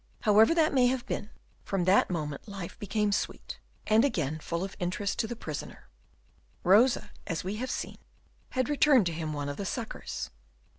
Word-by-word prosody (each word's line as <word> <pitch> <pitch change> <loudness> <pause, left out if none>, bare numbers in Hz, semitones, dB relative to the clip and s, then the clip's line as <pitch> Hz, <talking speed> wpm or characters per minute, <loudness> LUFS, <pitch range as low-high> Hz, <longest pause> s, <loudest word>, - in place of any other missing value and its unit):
However 220 +7 +5
that 320 -3 +3
may 255 -2 +5
have 250 -1 -1
been, 205 - -4 0.3
from 195 -2 -1
that 185 +3 +4
moment 150 -3 -4
life 195 -4 -7
became 210 0 0
sweet, - - -3 0.3
and 220 +2 +4
again 160 - 0
full 170 +3 -3
of 195 - -5
interest 190 +2 -2
to 225 - +1
the 240 - -5
prisoner. - - -7 0.8
Rosa, 230 +7 +4 0.2
as 165 - -2
we 195 +3 -3
have 255 +3 -3
seen, - - -4 0.5
had 255 -1 0
returned 290 -6 +5
to 170 - -1
him 160 -1 -3
one 145 -1 -3
of 145 - -4
the - - -3
suckers. 230 +4 -5
205 Hz, 180 wpm, -29 LUFS, 175-240 Hz, 0.8 s, However